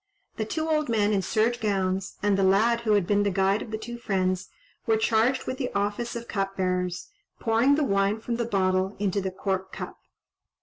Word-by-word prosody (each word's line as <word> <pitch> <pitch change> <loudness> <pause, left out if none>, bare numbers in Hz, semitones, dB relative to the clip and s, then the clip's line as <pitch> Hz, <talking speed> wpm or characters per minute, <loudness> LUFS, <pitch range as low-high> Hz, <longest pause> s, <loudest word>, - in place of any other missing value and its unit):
The 220 - -1
two 315 +8 -2
old 305 -3 +1
men 215 -2 +2
in 195 - +2
serge 225 +5 +1
gowns, 195 -3 -1
and 205 -1 +3
the 195 - +1
lad 215 +5 +3
who 220 -2 +2
had 200 -3 +3
been 205 +2 +2
the 205 - +2
guide 195 +2 +2
of - - -7
the 220 - -3
two 240 +2 -7
friends, 185 -4 -1 0.4
were 225 -1 +4
charged 225 +4 +2
with 260 - -4
the 255 - -2
office 205 +4 -1
of 235 0 -6
cupbearers, 185 - -2 0.3
pouring 235 +5 +3
the 305 - +1
wine 200 -2 +1
from 235 +1 -3
the 235 - -1
bottle 190 -2 +1
into 200 0 0
the 190 - -2
cork 190 0 -3
cup. - - -7
205 Hz, 205 wpm, -26 LUFS, 195-235 Hz, 0.4 s, were